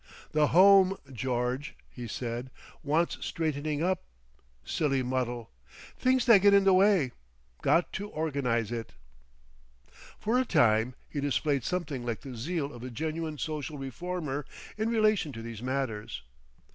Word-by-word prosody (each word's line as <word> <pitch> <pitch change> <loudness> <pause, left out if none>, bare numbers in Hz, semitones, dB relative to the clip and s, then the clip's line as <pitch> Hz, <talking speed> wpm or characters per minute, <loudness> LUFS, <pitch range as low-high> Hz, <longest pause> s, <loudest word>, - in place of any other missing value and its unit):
"The 150 -1 +3
Home, 195 +2 +6 0.2
George," 125 +2 -2
he 120 -1 -8
said, 120 +2 -4 0.3
"wants 160 +3 0
straightening 155 -2 -2
up. 185 +1 +1 0.6
Silly 135 - 0
muddle! 125 -2 -2 0.4
Things 255 -1 +2
that 230 -6 +7
get 200 0 +6
in 200 - +5
the 195 -1 +5
way. 185 -8 +4 0.5
Got 170 - +2
to 205 +2 -4
organise 135 - -1
it." 115 -2 -5 1.2
For 235 +4 +1
a - - +3
time 115 - +3
he 145 - -4
displayed 140 -1 0
something 160 -7 -2
like 120 -2 -3
the 130 -3 -8
zeal 145 +3 -3
of 120 - -10
a 130 - -6
genuine 155 +5 -3
social 155 0 -4
reformer 150 +1 -4 0.3
in 220 +1 -1
relation 215 -8 +2
to 115 - -7
these 115 -2 -7
matters. 125 - -3
145 Hz, 140 wpm, -29 LUFS, 125-180 Hz, 1.2 s, that